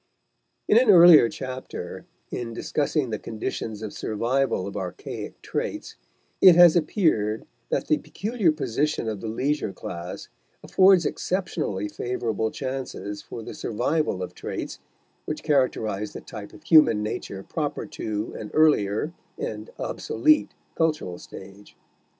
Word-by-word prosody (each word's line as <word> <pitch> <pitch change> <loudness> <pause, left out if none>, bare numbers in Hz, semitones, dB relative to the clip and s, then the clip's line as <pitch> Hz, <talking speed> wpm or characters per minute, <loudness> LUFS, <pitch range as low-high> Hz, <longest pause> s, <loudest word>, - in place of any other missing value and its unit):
In 220 - +6
an 250 -2 +2
earlier 170 - +9
chapter, 130 0 -7 0.2
in 115 -1 -4
discussing 145 -2 -1
the 110 - -2
conditions 110 -1 -5
of 105 - -5
survival 120 -1 0
of 100 - -7
archaic 95 -3 -6
traits, - - -4 0.5
it 185 -3 +9
has 175 -1 +8
appeared 155 - +1 0.2
that - - 0
the 155 - +2
peculiar 200 +3 0
position 145 -2 -1
of 105 -3 -3
the 115 - -5
leisure 135 +2 -1
class 85 -1 -7 0.4
affords 190 -2 +5
exceptionally 140 - -2
favorable 115 -1 -2
chances 130 -6 -5
for 115 - -8
the - - -7
survival 120 - -1
of - - -7
traits - - -6 0.5
which 155 0 -4
characterize 110 -8 0
the - - -7
type 105 -1 -9
of - - -15
human 150 -10 +5
nature 100 -2 -5
proper - - -3
to 105 0 -4
an 105 - -6
earlier 150 -3 +3 0.2
and - - -5
obsolete 310 -1 +1 0.2
cultural 155 - -1
stage. 100 +1 -12
125 Hz, 130 wpm, -25 LUFS, 105-155 Hz, 0.5 s, earlier